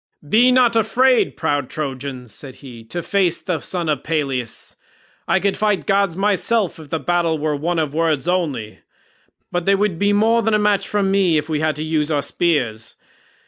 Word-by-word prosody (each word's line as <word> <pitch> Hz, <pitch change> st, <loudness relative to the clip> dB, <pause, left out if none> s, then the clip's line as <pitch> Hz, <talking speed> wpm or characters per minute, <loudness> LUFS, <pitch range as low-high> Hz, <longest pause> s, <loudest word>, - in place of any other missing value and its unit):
"Be 240 Hz, +10 st, +5 dB
not 250 Hz, -2 st, +4 dB
afraid, 230 Hz, -, +2 dB
proud 145 Hz, -3 st, -1 dB
Trojans," 135 Hz, -4 st, -5 dB
said 135 Hz, -3 st, -10 dB
he, 120 Hz, -3 st, -10 dB
"to 175 Hz, +8 st, -5 dB
face 185 Hz, -4 st, +1 dB
the 180 Hz, -4 st, -3 dB
son 175 Hz, +2 st, -4 dB
of 150 Hz, -3 st, -1 dB
Peleus; 135 Hz, -7 st, -3 dB, 0.5 s
I 190 Hz, -, +3 dB
could 200 Hz, +1 st, 0 dB
fight 210 Hz, -2 st, 0 dB
gods 195 Hz, -3 st, +1 dB
myself 205 Hz, 0 st, +1 dB
if 155 Hz, -2 st, -12 dB
the 165 Hz, -, -1 dB
battle 170 Hz, -2 st, 0 dB
were 150 Hz, 0 st, -1 dB
one 165 Hz, +4 st, -2 dB
of 155 Hz, -3 st, -1 dB
words 160 Hz, -1 st, 0 dB
only, 150 Hz, -12 st, -2 dB, 0.7 s
but 175 Hz, 0 st, -2 dB
they 200 Hz, -, +5 dB
would 195 Hz, -4 st, -1 dB
be 205 Hz, 0 st, +2 dB
more 225 Hz, +3 st, +3 dB
than 225 Hz, 0 st, +1 dB
a -, -, +4 dB
match 210 Hz, -1 st, +1 dB
for 205 Hz, -1 st, 0 dB
me, 195 Hz, -4 st, +2 dB
if 150 Hz, +1 st, -3 dB
we 155 Hz, -1 st, 0 dB
had 155 Hz, 0 st, 0 dB
to 150 Hz, -, -4 dB
use 155 Hz, -1 st, 0 dB
our 145 Hz, -2 st, 0 dB
spears. 125 Hz, -8 st, -1 dB
165 Hz, 190 wpm, -20 LUFS, 145-200 Hz, 0.7 s, Be